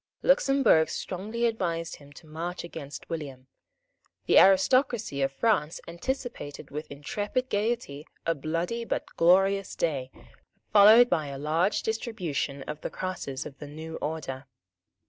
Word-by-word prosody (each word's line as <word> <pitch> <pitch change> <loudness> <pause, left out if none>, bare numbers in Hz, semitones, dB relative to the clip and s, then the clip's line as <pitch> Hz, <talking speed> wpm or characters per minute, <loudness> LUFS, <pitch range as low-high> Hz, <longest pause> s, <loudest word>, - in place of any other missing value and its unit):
Luxemburg 275 - +4
strongly 210 +8 -3
advised 170 -7 -2
him 145 -1 -16
to 160 - -14
march 165 +3 -5
against 155 -4 -8
William. 140 -6 -6 0.8
The - - +6
aristocracy 200 - +3
of 135 0 +1
France 160 0 +1
anticipated 170 - -5
with 150 +2 -6
intrepid 205 - -3
gaiety 205 -9 -2 0.2
a 165 - +2
bloody 165 +10 -2
but - - -2
a - - -21
glorious 195 +3 +3
day, 140 -6 -1 0.6
followed 215 +4 +8
by 155 -9 0
a 140 -1 -6
large 160 +7 0
distribution 175 - -3
of 150 +2 -7
the - - -3
crosses 165 -8 -5
of 140 -2 -10
the 150 - -8
new 160 +2 -7
order. 140 -3 -5
165 Hz, 135 wpm, -28 LUFS, 145-215 Hz, 0.8 s, followed